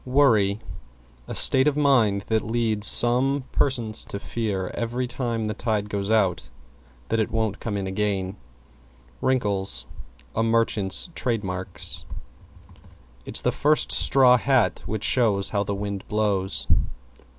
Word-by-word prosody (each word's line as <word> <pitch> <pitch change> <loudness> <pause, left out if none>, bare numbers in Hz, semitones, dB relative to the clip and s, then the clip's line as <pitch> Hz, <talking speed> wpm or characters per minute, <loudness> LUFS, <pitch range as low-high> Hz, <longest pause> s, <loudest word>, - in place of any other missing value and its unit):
=WORRY= 115 -7 +2 0.7
A - - -6
state 130 +2 +5
of 150 -1 0
mind 120 -9 +2
that 110 +1 -1
leads 110 -2 -1
some 130 +3 +6
persons 120 -5 -1
to 100 - -7
fear, 100 -5 -4
every 120 +2 -3
time 120 -2 -3
the 105 - -3
tide 105 -1 -3
goes 100 0 -3
out, 100 -5 0 0.6
that 115 - 0
it 110 - -1
won't 110 -3 -2
come 105 -3 -4
in 100 - -4
again. 95 -1 -3 0.9
=WRINKLES= 100 - -1 0.5
A 110 - 0
merchant's 115 - +1
trade 115 -8 -2
marks. 95 -1 -6 1.2
It's - - -2
the - - 0
first 150 +1 +2
straw 125 -2 +4
hat 130 -1 +1
which 110 -1 -4
shows 105 -6 +1
how 100 -1 0
the 100 0 -4
wind 100 -1 -6
blows. 100 -3 -1
110 Hz, 135 wpm, -23 LUFS, 100-120 Hz, 1.2 s, some